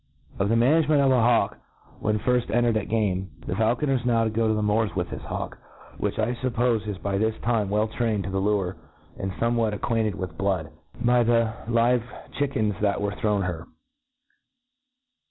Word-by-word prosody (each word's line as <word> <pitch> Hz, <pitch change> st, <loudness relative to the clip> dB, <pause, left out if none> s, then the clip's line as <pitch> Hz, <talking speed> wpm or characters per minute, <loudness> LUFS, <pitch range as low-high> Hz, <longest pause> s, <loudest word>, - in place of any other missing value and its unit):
Of 100 Hz, -, +1 dB
the 115 Hz, -, +3 dB
Management 150 Hz, +5 st, +4 dB
of 135 Hz, -1 st, +4 dB
a 125 Hz, -2 st, +4 dB
Hawk 120 Hz, 0 st, +2 dB, 0.4 s
ivhenfirji 120 Hz, +3 st, +1 dB
en^ 120 Hz, +1 st, +2 dB
tered 120 Hz, -2 st, +2 dB
at 105 Hz, -3 st, -2 dB
Game. 95 Hz, -4 st, 0 dB, 0.2 s
.THE -, -, -2 dB
faulconer 120 Hz, +6 st, +1 dB
is -, -, -10 dB
now 115 Hz, -2 st, +2 dB
to 110 Hz, -, 0 dB
go 115 Hz, +1 st, +1 dB
.to 110 Hz, -, +2 dB
the 105 Hz, -, 0 dB
moori 105 Hz, 0 st, +1 dB
with 90 Hz, -2 st, -1 dB
his -, -, -6 dB
hawk, -, -, -5 dB, 0.4 s
which -, -, -2 dB
I 110 Hz, +3 st, +1 dB
fuppofe 120 Hz, -3 st, 0 dB
is 105 Hz, -2 st, -3 dB
by 100 Hz, 0 st, -2 dB
this 110 Hz, 0 st, 0 dB
time 115 Hz, -4 st, +1 dB
well 105 Hz, +2 st, +1 dB
trained 110 Hz, -2 st, -1 dB
to 95 Hz, -, -5 dB
the 95 Hz, -, 0 dB
lure, 95 Hz, -3 st, 0 dB, 0.4 s
and 95 Hz, 0 st, -2 dB
fomewhat 115 Hz, 0 st, 0 dB
acquaint* 110 Hz, +2 st, 0 dB
cd -, -, -9 dB
with 95 Hz, -1 st, -5 dB
blood, 95 Hz, -4 st, -1 dB, 0.3 s
by 120 Hz, 0 st, +4 dB
the 115 Hz, -1 st, +2 dB
live 120 Hz, +1 st, +3 dB, 0.4 s
chickens 110 Hz, -7 st, +1 dB
that 100 Hz, -2 st, +1 dB
were 100 Hz, 0 st, -1 dB
thrown 105 Hz, -3 st, +1 dB
her. 85 Hz, -2 st, -4 dB
110 Hz, 190 wpm, -25 LUFS, 100-120 Hz, 0.4 s, Management